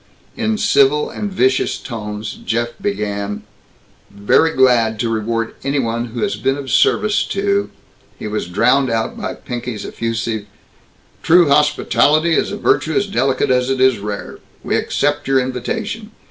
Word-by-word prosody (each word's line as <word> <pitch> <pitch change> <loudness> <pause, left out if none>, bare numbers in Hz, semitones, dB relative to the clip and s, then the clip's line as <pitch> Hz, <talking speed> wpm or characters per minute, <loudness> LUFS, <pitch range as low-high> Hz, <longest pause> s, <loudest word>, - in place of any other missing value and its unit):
In 220 -2 -1
civil 140 -3 +3
and 205 -1 -4
vicious 130 -7 +1
tones 105 -3 -6
Jeff 120 +1 -1
began, 100 0 -3 0.7
"Very 100 +10 +2
glad 120 -4 +3
to 115 - 0
reward 115 +1 -2
any 140 +1 -1
one 115 -2 -1
who 120 0 -6
has 200 - -1
been 135 +1 0
of 135 -3 -6
service 210 - +3
to 200 0 0 0.2
" - - -33
He - - -8
was 105 -4 -3
drowned 125 +9 +2
out 115 -1 -1
by - - -5
Pinky's 120 -3 -6
effusive, 115 -2 -3 0.7
"True 170 -2 +5
hospitality 150 +2 +3
is - - +1
a - - -4
virtue 160 - +1
as 205 - +2
delicate 135 -10 0
as 125 0 +2
it 135 -1 0
is 130 -4 +4
rare. 105 0 -6 0.2
We - - -1
accept 145 0 0
your 135 -1 +3
invitation. 210 - -4
130 Hz, 155 wpm, -18 LUFS, 115-150 Hz, 0.7 s, True